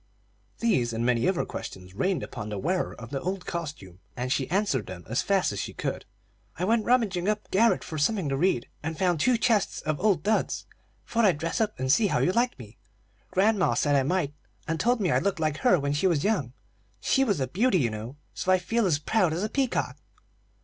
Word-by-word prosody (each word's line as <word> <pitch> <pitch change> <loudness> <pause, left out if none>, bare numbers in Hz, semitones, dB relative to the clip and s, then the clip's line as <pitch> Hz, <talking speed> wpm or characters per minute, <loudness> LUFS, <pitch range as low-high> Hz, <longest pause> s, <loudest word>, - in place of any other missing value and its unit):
These 125 - +1
and 115 +1 -1
many 120 -1 +2
other 185 -2 +1
questions 90 0 -8
rained 165 - 0
upon 105 - -6
the 105 - -4
wearer 180 - -1
of 115 +1 -10
the 135 -1 -3
old 185 0 -3
costume, 145 - -6 0.2
and 125 +1 0
she 135 - -2
answered 185 - 0
them 90 -2 -8
as 115 +3 0
fast 195 - +1
as 100 - -4
she - - -4
could. - - -3 0.5
"I 180 - -1
went 225 +1 +2
rummaging 210 -7 +2
up 215 0 -2
garret 225 +4 +3
for 155 -2 -5
something 190 +2 +1
to 135 - 0
read, 145 -5 +1
and 160 +1 -4
found 175 -3 +1
two 250 +8 +3
chests 225 -4 +1
of 155 -1 -2
old 190 -6 +2
duds. 220 +1 0 0.4
Thought 230 -1 +1
I'd 180 -7 +4
dress 165 +7 -2
up 215 -8 -1
and 130 0 +1
see 210 +8 +4
how - - +1
you 180 - +2
liked 240 +5 +1
me. 115 -3 -13 0.5
Grandma 200 0 +2
said 145 -1 +2
I 140 - +4
might, 145 0 0 0.3
and 160 0 -1
told 240 0 +2
me 180 - +1
I - - +3
looked 195 -3 -1
like 155 -2 0
her 170 +5 +4
when 140 0 -1
she 145 +6 +2
was 165 -6 +1
young. 185 - 0 0.5
She 270 - +2
was 205 - +1
a 130 - +1
beauty, 200 - +2
you 120 -8 +1
know; 110 +5 -6 0.2
so 185 - -1
I 185 - +6
feel 215 +4 0
as 160 -5 +2
proud 175 +2 +1
as 175 +5 -2
a 215 - -1
peacock." 265 0 -1
175 Hz, 225 wpm, -27 LUFS, 135-205 Hz, 0.5 s, I